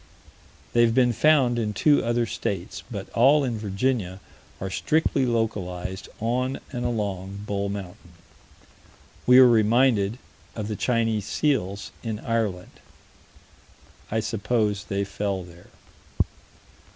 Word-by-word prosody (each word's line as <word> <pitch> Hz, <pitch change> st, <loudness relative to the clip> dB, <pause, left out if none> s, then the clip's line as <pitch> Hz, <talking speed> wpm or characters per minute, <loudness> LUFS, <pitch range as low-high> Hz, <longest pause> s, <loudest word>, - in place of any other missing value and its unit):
They 120 Hz, -, +4 dB
have 115 Hz, -1 st, +3 dB
been 125 Hz, -2 st, +4 dB
found 125 Hz, -1 st, +3 dB
in 105 Hz, -2 st, -1 dB
two 145 Hz, +8 st, +3 dB
other 120 Hz, 0 st, +1 dB
states, 100 Hz, -3 st, -4 dB
but 100 Hz, -5 st, -6 dB
all 140 Hz, +5 st, +5 dB
in 120 Hz, -4 st, -2 dB
Virginia 100 Hz, -2 st, -1 dB, 0.4 s
are 95 Hz, 0 st, -4 dB
strictly 140 Hz, -, +1 dB
localized 95 Hz, -5 st, -2 dB
on 125 Hz, +4 st, -1 dB
and 120 Hz, -2 st, -4 dB
along 100 Hz, -4 st, -3 dB
Bull 100 Hz, -1 st, -2 dB
Mountain. 90 Hz, -3 st, -8 dB, 1.1 s
We 125 Hz, 0 st, +8 dB
are 130 Hz, -1 st, +9 dB
reminded 115 Hz, -1 st, +3 dB, 0.4 s
of 105 Hz, -2 st, -4 dB
the 105 Hz, -, -2 dB
Chinese 115 Hz, -3 st, 0 dB
seals 100 Hz, -10 st, -1 dB
in 110 Hz, -2 st, -3 dB
Ireland. 105 Hz, -5 st, -3 dB, 1.3 s
I 110 Hz, +1 st, 0 dB
suppose 110 Hz, -2 st, -1 dB
they 100 Hz, 0 st, -1 dB
fell 100 Hz, -1 st, -3 dB
there. 85 Hz, -1 st, -15 dB
110 Hz, 120 wpm, -25 LUFS, 100-120 Hz, 1.3 s, are